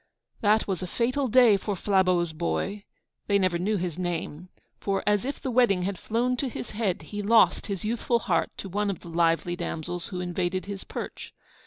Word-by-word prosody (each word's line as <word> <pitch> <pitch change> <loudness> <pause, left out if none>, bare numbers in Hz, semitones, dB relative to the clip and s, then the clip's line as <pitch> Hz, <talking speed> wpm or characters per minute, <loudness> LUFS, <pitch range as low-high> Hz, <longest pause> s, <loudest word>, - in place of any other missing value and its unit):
That 215 +1 +3
was 190 -3 -2
a 185 - -3
fatal 255 +7 0
day 240 -3 +6
for 200 +1 -3
Flabeau's 185 -3 +2
boy 195 +5 -2 0.4
(they 200 - +4
never 185 -3 +1
knew 205 +4 +1
his 180 -2 -3
name); 175 -1 -3 0.3
for, 195 -1 -1
as 210 +2 +2
if 280 - -3
the 260 - -3
wedding 230 -7 +3
had 190 0 -2
flown 245 +3 0
to 265 +1 -1
his 240 - -6
head, 210 -4 -1
he 205 -1 -5
lost 205 -4 +4
his 200 -2 -3
youthful 235 +2 +1
heart 175 -7 0
to - - -6
one 205 +2 -1
of 195 - -4
the 170 - -10
lively 165 +1 +1
damsels 175 0 -4
who 185 - -5
invaded 180 +1 -2
his 200 -1 -6
perch. - - -7
195 Hz, 195 wpm, -27 LUFS, 175-215 Hz, 0.4 s, day